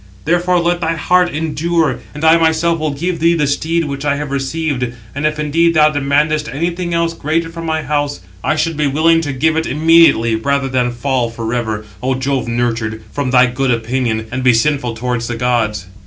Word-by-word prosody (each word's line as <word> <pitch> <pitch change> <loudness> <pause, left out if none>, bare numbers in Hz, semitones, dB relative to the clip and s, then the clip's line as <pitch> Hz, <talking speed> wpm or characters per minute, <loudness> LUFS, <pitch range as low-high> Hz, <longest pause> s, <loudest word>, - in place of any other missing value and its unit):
Therefore 175 +2 +2
let 175 +1 0
thy 165 0 0
heart 180 +3 +2
endure, 160 +1 -1 0.2
and 150 - -7
I 160 +1 +7
myself 165 +1 +1
will 155 0 -1
give 170 +5 -3
thee 170 +1 +3
the 150 -3 +1
steed 160 +4 0
which 140 -1 -5
I 145 -1 +1
have 145 -1 -5
received. 135 -3 -2 0.2
And 145 +3 0
if 155 0 -3
indeed 165 +3 +1
thou 155 0 +5
demandest 150 +2 0
anything 170 +4 -3
else 170 0 0
greater 165 +1 -2
from 165 0 -7
my 160 -1 -1
house, 145 0 -1 0.2
I - - +1
should 155 0 -1
be 150 -1 +1
willing 165 +4 +3
to 145 -3 -3
give 155 +4 +1
it 160 0 -1
immediately 155 -7 +4
rather 140 +4 -1
than 125 -1 +1
fall 125 -1 -1
for 115 0 -5
ever, 110 -3 -2 0.2
Ο 130 0 0
Jove 130 -1 -2
nurtured, 115 -2 -2
from 145 -3 -2
thy 125 0 +5
good 130 +2 -1
opinion, 115 -1 -1
and 130 +1 -3
be 125 -2 +5
sinful 125 -1 0
towards 120 0 -2
the 120 - -3
gods." 115 -5 -1
145 Hz, 200 wpm, -16 LUFS, 125-165 Hz, 0.2 s, I